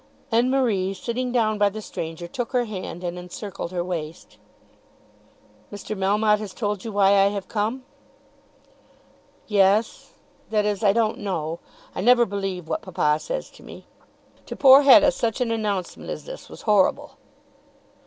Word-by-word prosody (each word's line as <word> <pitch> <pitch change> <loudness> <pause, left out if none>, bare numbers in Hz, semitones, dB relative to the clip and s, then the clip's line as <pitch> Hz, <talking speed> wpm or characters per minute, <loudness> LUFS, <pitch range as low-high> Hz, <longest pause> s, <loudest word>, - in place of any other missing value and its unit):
and 235 +3 +3
Marie, 210 -8 0
sitting 250 +5 -3
down 215 -3 +1
by 205 0 +4
the 215 +2 -7
stranger, 165 -4 -6
took 240 +7 -5
her 245 -1 +2
hand 185 -4 -7
and 175 0 -4
encircled 180 0 -7
her 175 -1 -2
waist. 165 -3 -6 1.3
"Mr. 205 +1 -6
Melmotte 210 +2 +2
has 210 -3 -8
told 205 -4 -3
you 225 - -5
why 200 -1 +3
I 195 -1 +5
have 200 -1 -4
come." 225 +5 -2 1.6
"Yes; 205 +1 +1 0.4
that 210 -1 +1
is, 210 0 -2
I 200 - +5
don't 220 0 0
know. 170 -5 -3 0.3
I - - -4
never 240 +3 +5
believe 195 -4 -4
what - - -2
papa 150 -5 0
says - - -5
to - - -17
me." - - -12 0.6
To - - -6
poor 270 0 +8
Hetta 290 +1 +7
such 230 -2 -2
an 245 -2 0
announcement 205 -5 -3
as - - -6
this - - -10
was - - -12
horrible. 205 -4 +1
205 Hz, 155 wpm, -23 LUFS, 190-230 Hz, 1.6 s, poor